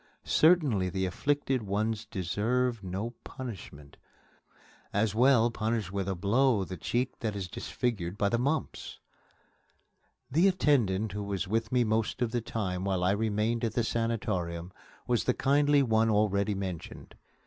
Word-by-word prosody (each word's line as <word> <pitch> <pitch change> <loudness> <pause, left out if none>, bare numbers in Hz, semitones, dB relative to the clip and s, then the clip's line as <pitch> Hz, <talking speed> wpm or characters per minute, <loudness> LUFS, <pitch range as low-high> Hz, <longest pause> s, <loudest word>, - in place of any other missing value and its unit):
Certainly 145 - +3
the 95 +1 -1
afflicted 135 +6 0
one 105 +2 0 0.2
deserves 115 +6 0
no 95 +5 -4
punishment. 95 - -9 0.9
As 105 0 +1
well 120 0 +4
punish 110 -4 -2
with 100 -1 -2
a 95 - -1
blow 110 +4 +2
the 95 0 -6
cheek 125 +9 -2
that 110 -3 -2
is 95 -2 -4
disfigured 95 -1 -3
by 100 - +2
the 120 - 0
mumps. 140 +6 -2 1.3
The 165 +8 +4
attendant 120 - +2
who 105 +1 -4
was 100 -2 -2
with 115 +3 -1
me 125 -1 +3
most 110 +2 0
of 115 - -1
the 120 - -1
time 95 -5 -3
while 95 -2 0
I 90 - +3
remained 110 +2 0
at 115 -2 -1
the 120 - +2
sanatorium 95 -7 -2 0.3
was 120 -2 0
the 125 - +2
kindly 145 +1 +3
one 115 -2 +2
already 105 -1 +2
mentioned. 95 -4 -6
110 Hz, 150 wpm, -29 LUFS, 95-120 Hz, 1.3 s, well